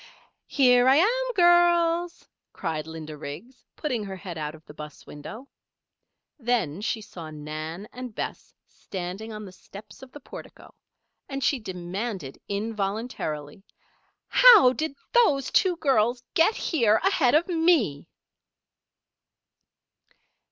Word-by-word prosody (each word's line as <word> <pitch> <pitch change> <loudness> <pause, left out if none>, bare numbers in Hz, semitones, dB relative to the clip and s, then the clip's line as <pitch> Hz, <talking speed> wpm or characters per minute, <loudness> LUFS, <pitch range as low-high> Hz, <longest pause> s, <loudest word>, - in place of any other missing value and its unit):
"Here 250 -3 +4
I 265 - +6
am, - - +2
girls!" 345 -1 +3 0.3
cried 155 -1 -4
Linda 160 -1 -8
Riggs, 180 - -10
putting 255 -8 -2
her 195 -1 -6
head 185 -2 -8
out 155 -1 -5
of 160 - -18
the - - -12
'bus 150 0 -10
window. 215 - -10 0.9
Then 225 - -1
she 220 +1 -2
saw 185 -7 -9
Nan 155 +5 -7
and 250 -3 -8
Bess - - -6
standing 190 +4 -7
on 215 -1 -7
the 190 - -10
steps 200 +3 -14
of 265 -1 -12
the 290 - -11
portico, - - -12 0.6
and 275 -1 -4
she 275 +1 +2
demanded 185 - -5
involuntarily: 200 - -4 0.6
"How 450 - +8
did 310 0 -3 0.2
those 295 - +3
two 370 -2 +3
girls 245 -5 +1
get 395 +4 +4
here 230 -10 +2
ahead 310 -10 +3
of 325 +4 +3
me?" 325 - +2
225 Hz, 125 wpm, -26 LUFS, -, 0.9 s, How